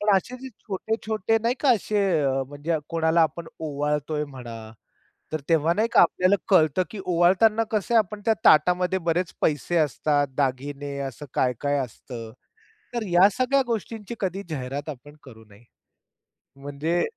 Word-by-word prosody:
पण 205 Hz, -1 st, +4 dB
असे 245 Hz, +7 st, -3 dB
जे 265 Hz, -, -6 dB
छोटे-छोटे 220 Hz, +1 st, -1 dB
नाही 235 Hz, +2 st, +1 dB
का, 280 Hz, -, +4 dB
असे 210 Hz, -2 st, +1 dB, 0.5 s
म्हणजे 145 Hz, +3 st, -2 dB
कोणाला 165 Hz, 0 st, +2 dB
आपण 165 Hz, +1 st, -2 dB
ओवाळतोय 150 Hz, 0 st, -2 dB
म्हणा, 120 Hz, -5 st, -9 dB, 0.6 s
तर 155 Hz, -, -2 dB
तेव्हा 165 Hz, 0 st, +3 dB
नाही 220 Hz, +5 st, +1 dB
का -, -, +6 dB
आपल्याला 185 Hz, +3 st, +3 dB
कळतं, 165 Hz, -1 st, +4 dB
की 215 Hz, -, -7 dB
ओवाळताना 185 Hz, +6 st, +3 dB
कसं 215 Hz, +2 st, 0 dB
आपण 210 Hz, -1 st, 0 dB
त्या 225 Hz, -, +4 dB
ताटामध्ये 180 Hz, +4 st, +4 dB
बरेच 170 Hz, +1 st, -1 dB
पैसे 155 Hz, +3 st, +1 dB
असतात, 150 Hz, -2 st, +1 dB
दागिने 140 Hz, +1 st, -2 dB
असं 135 Hz, +3 st, -9 dB
काय-काय 140 Hz, +3 st, 0 dB
असतं, 120 Hz, -3 st, -7 dB, 0.6 s
तर 235 Hz, -2 st, -2 dB
या 180 Hz, +2 st, +6 dB
सगळ्या 260 Hz, +2 st, +3 dB
गोष्टींची 225 Hz, 0 st, -4 dB
कधी 195 Hz, 0 st, -2 dB
जाहिरात 140 Hz, 0 st, -4 dB
आपण 145 Hz, +1 st, -10 dB
करू 115 Hz, -5 st, -14 dB
नये. 100 Hz, +3 st, -18 dB, 1.0 s
म्हणजे 145 Hz, +5 st, -1 dB
165 Hz, 145 wpm, -25 LUFS, 145-200 Hz, 1.0 s, का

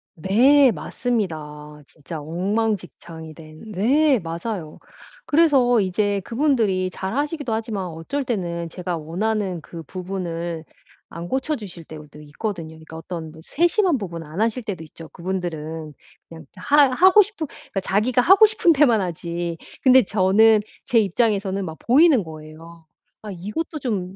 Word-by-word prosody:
네. 250 Hz, -, +5 dB
맞습니다. 150 Hz, -6 st, -4 dB
진짜 155 Hz, +2 st, -9 dB
엉망진창이 175 Hz, -1 st, -3 dB
된 155 Hz, +7 st, -12 dB
네 265 Hz, +7 st, +3 dB
맞아요. 170 Hz, 0 st, -6 dB, 0.5 s
그래서 280 Hz, -7 st, +4 dB
이제 200 Hz, +1 st, 0 dB
그분들이 230 Hz, -8 st, +1 dB
잘 190 Hz, +2 st, -5 dB
하시기도 290 Hz, -3 st, -2 dB
하지만 220 Hz, -4 st, -3 dB
어쩔 165 Hz, -, -4 dB
때는 175 Hz, -8 st, -3 dB
제가 180 Hz, 0 st, -4 dB
원하는 185 Hz, +2 st, -2 dB
그 165 Hz, +1 st, -10 dB
부분을 175 Hz, -3 st, -5 dB, 0.4 s
안 170 Hz, +1 st, -7 dB
고쳐 270 Hz, +4 st, -1 dB
주실 185 Hz, -7 st, -9 dB
때도 150 Hz, -1 st, -12 dB
있거든요. 165 Hz, +3 st, -5 dB
그러니까 160 Hz, 0 st, -12 dB
어떤 165 Hz, -1 st, -7 dB
뭐 160 Hz, -, -14 dB
세심한 345 Hz, -, +2 dB
부분 170 Hz, -6 st, -6 dB
안 160 Hz, +6 st, -5 dB
하실 230 Hz, +2 st, 0 dB
때도 195 Hz, -7 st, -5 dB
있죠. 160 Hz, +1 st, -12 dB
그분들은 165 Hz, -4 st, -5 dB, 0.3 s
그냥 160 Hz, -1 st, -12 dB
하 285 Hz, +8 st, +4 dB
하고 375 Hz, +9 st, +6 dB
싶은 395 Hz, -7 st, -3 dB, 0.3 s
자기가 220 Hz, +6 st, +1 dB
하고 385 Hz, -, +7 dB
싶은 420 Hz, -5 st, +3 dB
데만 260 Hz, -8 st, +4 dB
하지 170 Hz, -1 st, -4 dB, 0.3 s
근데 260 Hz, -1 st, +7 dB
저는 210 Hz, +2 st, +4 dB, 0.2 s
제 235 Hz, -, +3 dB
입장에서는 200 Hz, -1 st, 0 dB
막 160 Hz, -2 st, -7 dB
보이는 275 Hz, -, +4 dB
거예요. 160 Hz, +1 st, -12 dB, 0.4 s
아 215 Hz, -, -7 dB
이것도 210 Hz, -, -5 dB
좀 195 Hz, -8 st, -3 dB
190 Hz, 300 characters per minute, -22 LUFS, 165-245 Hz, 0.5 s, 하고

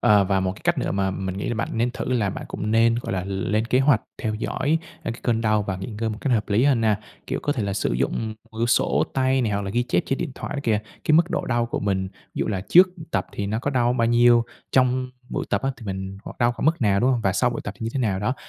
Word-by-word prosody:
ờ, 105 Hz, -2 st, +5 dB
và 95 Hz, 0 st, +1 dB
một 95 Hz, 0 st, 0 dB
cái -, -, -15 dB
cách -, -, +2 dB
nữa -, -, -1 dB
mà 95 Hz, -1 st, 0 dB
mình 95 Hz, 0 st, -4 dB
nghĩ 100 Hz, -, -3 dB
là 120 Hz, -, -1 dB
bạn 110 Hz, -, -2 dB
nên 120 Hz, +2 st, +1 dB
thử 130 Hz, +1 st, -3 dB
là 105 Hz, -6 st, +1 dB
bạn -, -, -6 dB
cũng 105 Hz, +2 st, -3 dB
nên, 115 Hz, +1 st, +4 dB
gọi 115 Hz, -, -4 dB
là, 90 Hz, -1 st, -2 dB
lên 100 Hz, +3 st, -1 dB
kế 125 Hz, +2 st, +3 dB
hoạch 135 Hz, -5 st, +4 dB, 0.2 s
theo 110 Hz, -1 st, -1 dB
dõi, 145 Hz, +8 st, 0 dB, 0.2 s
a, -, -, -3 dB
cái 115 Hz, -, -7 dB
cơn 115 Hz, -2 st, +1 dB
đau 110 Hz, -2 st, +2 dB
và 95 Hz, -2 st, -3 dB
nghỉ 95 Hz, -, -6 dB
ngơi 115 Hz, -1 st, 0 dB
một 105 Hz, -, -6 dB
cách 135 Hz, -, 0 dB
hợp 110 Hz, -2 st, +1 dB
lý 105 Hz, +5 st, +3 dB
hơn 135 Hz, -5 st, +3 dB
nha. 110 Hz, -2 st, +3 dB, 0.3 s
Kiểu, -, -, -2 dB
có 145 Hz, -, +1 dB
thể 120 Hz, -6 st, -2 dB
là 100 Hz, -1 st, -1 dB
sử -, -, -1 dB
dụng, 65 Hz, +3 st, 0 dB
ừm, 110 Hz, -, -2 dB
một 110 Hz, 0 st, -12 dB
quyển 115 Hz, -, +2 dB
sổ 120 Hz, -, +2 dB
tay 130 Hz, -1 st, +2 dB
này, 110 Hz, -, 0 dB
hoặc 100 Hz, 0 st, -1 dB
là 95 Hz, -, -4 dB
ghi 120 Hz, +3 st, +1 dB
chép 120 Hz, -, +1 dB
trên 135 Hz, -, -1 dB
điện 170 Hz, -5 st, -3 dB
thoại -, -, -6 dB
đó -, -, -2 dB
kìa, 110 Hz, -2 st, +2 dB, 0.3 s
cái 155 Hz, -, +2 dB
mức 170 Hz, +3 st, +5 dB
độ -, -, -1 dB
đau 120 Hz, -1 st, +1 dB
của 120 Hz, -, -3 dB
mình, 95 Hz, -2 st, 0 dB
ví -, -, -9 dB
dụ -, -, 0 dB
là 95 Hz, -4 st, -1 dB
trước, 180 Hz, +2 st, +8 dB
ừ, 165 Hz, -, -9 dB
tập -, -, 0 dB
thì 100 Hz, -, -3 dB
nó 110 Hz, +2 st, -1 dB
có 145 Hz, -, -2 dB
đau 120 Hz, -2 st, +2 dB
bao 115 Hz, -2 st, +1 dB
nhiêu? 120 Hz, 0 st, +5 dB, 0.3 s
Trong 130 Hz, 0 st, +2 dB, 0.2 s
buổi -, -, -3 dB
tập -, -, +1 dB
á 135 Hz, -, +1 dB
thì 115 Hz, -, -11 dB
mình 95 Hz, 0 st, -5 dB
hoặc -, -, -9 dB
đau 120 Hz, 0 st, +3 dB
khoảng 120 Hz, -, -3 dB
mức 160 Hz, -1 st, +2 dB
nào, 100 Hz, -3 st, +3 dB
đúng 130 Hz, +2 st, +3 dB
hông? 120 Hz, -3 st, +1 dB
Và 95 Hz, -3 st, +1 dB
sau 125 Hz, +6 st, +2 dB
buổi 120 Hz, -, -4 dB
tập 100 Hz, -, -5 dB
thì 115 Hz, -, -6 dB
như 115 Hz, -, -2 dB
thế -, -, 0 dB
nào 100 Hz, -6 st, 0 dB
đó? 125 Hz, +6 st, 0 dB
115 Hz, 320 wpm, -24 LUFS, 100-125 Hz, 0.3 s, trước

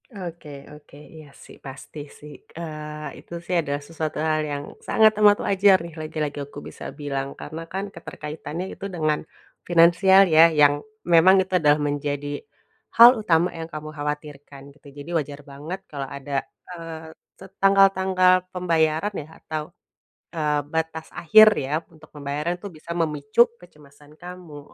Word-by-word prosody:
Oke 175 Hz, -, -9 dB, 0.2 s
oke, 150 Hz, -1 st, -16 dB, 0.2 s
iya 155 Hz, -2 st, -12 dB, 0.2 s
sih, -, -, -14 dB
pasti 135 Hz, +3 st, -10 dB, 0.2 s
sih, 150 Hz, 0 st, -12 dB, 0.2 s
eee, 150 Hz, -2 st, -7 dB
itu -, -, -13 dB
sih 180 Hz, -, -2 dB
adalah 145 Hz, -2 st, -3 dB
sesuatu 160 Hz, -2 st, -4 dB
hal 155 Hz, 0 st, 0 dB
yang 145 Hz, 0 st, -4 dB, 0.2 s
sangat 220 Hz, 0 st, +5 dB
amat 205 Hz, 0 st, +7 dB
wajar 195 Hz, 0 st, +5 dB
nih 170 Hz, -1 st, -9 dB
lagi-lagi 155 Hz, -1 st, -4 dB
aku 145 Hz, +1 st, -11 dB
bisa -, -, -11 dB
bilang, 140 Hz, -2 st, -3 dB
karena 160 Hz, +2 st, -7 dB
kan 195 Hz, +1 st, -3 dB
keterkaitannya 155 Hz, +1 st, -7 dB
itu -, -, -8 dB
dengan 155 Hz, -2 st, 0 dB, 0.5 s
finansial 175 Hz, +3 st, +6 dB
ya 165 Hz, 0 st, +6 dB
yang 145 Hz, -2 st, +5 dB, 0.3 s
memang 175 Hz, +2 st, +6 dB
itu 190 Hz, -, -11 dB
adalah 150 Hz, -1 st, +3 dB
menjadi 145 Hz, 0 st, -3 dB, 0.5 s
hal 235 Hz, +1 st, +11 dB
utama 170 Hz, -2 st, +3 dB
yang 165 Hz, 0 st, -7 dB
kamu 155 Hz, -1 st, -7 dB
khawatirkan, 145 Hz, -1 st, -6 dB
gitu. 150 Hz, -, -19 dB
Jadi 145 Hz, +3 st, -11 dB
wajar 145 Hz, -2 st, -4 dB
banget 150 Hz, +7 st, -7 dB
kalo 140 Hz, -2 st, -4 dB
ada, 140 Hz, 0 st, -3 dB, 0.3 s
eee, 165 Hz, -1 st, -8 dB, 0.3 s
set 190 Hz, 0 st, -13 dB
tanggal-tanggal 190 Hz, -2 st, +4 dB, 0.2 s
pembayaran 165 Hz, +1 st, 0 dB
ya 150 Hz, -, -6 dB
atau, 155 Hz, -1 st, -5 dB, 0.7 s
eee, 150 Hz, -2 st, 0 dB
batas 160 Hz, 0 st, -3 dB
akhir 215 Hz, +6 st, +6 dB
ya 135 Hz, +2 st, -4 dB, 0.2 s
untuk 155 Hz, -1 st, -18 dB
pembayaran 150 Hz, +4 st, -4 dB
tuh 195 Hz, 0 st, -9 dB
bisa 155 Hz, +1 st, -17 dB
memicu 160 Hz, -, +2 dB
kecemasan 150 Hz, -3 st, -19 dB
kamu, 175 Hz, -4 st, -10 dB
155 Hz, 150 wpm, -23 LUFS, 145-175 Hz, 0.7 s, hal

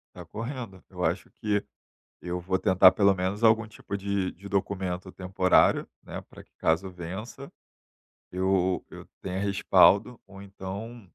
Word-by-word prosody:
Tá -, -, -9 dB
correndo. 115 Hz, -5 st, -7 dB
Eu 90 Hz, -2 st, -5 dB
acho 85 Hz, +3 st, -1 dB
que 105 Hz, -1 st, -1 dB, 0.6 s
eu 90 Hz, 0 st, -3 dB
vou 95 Hz, +2 st, -1 dB
tentar 95 Hz, -2 st, +6 dB
pelo 100 Hz, -1 st, +4 dB
menos 95 Hz, +4 st, -3 dB
algum 110 Hz, 0 st, +4 dB
tipo 100 Hz, -1 st, -6 dB
de 100 Hz, -1 st, -1 dB
de 100 Hz, +3 st, -12 dB
documento 95 Hz, -2 st, -2 dB
temporário, 95 Hz, 0 st, +2 dB, 0.2 s
né, -, -, -7 dB
pra -, -, -15 dB
que -, -, -35 dB
caso 80 Hz, +4 st, +1 dB
vença, 95 Hz, +10 st, -8 dB, 0.8 s
eu 95 Hz, 0 st, +1 dB
eu -, -, -11 dB
tenha 95 Hz, 0 st, -3 dB
respaldo 100 Hz, +3 st, +4 dB
ou 100 Hz, 0 st, -12 dB
então 100 Hz, +3 st, -8 dB
95 Hz, 145 wpm, -27 LUFS, 95-100 Hz, 0.8 s, tentar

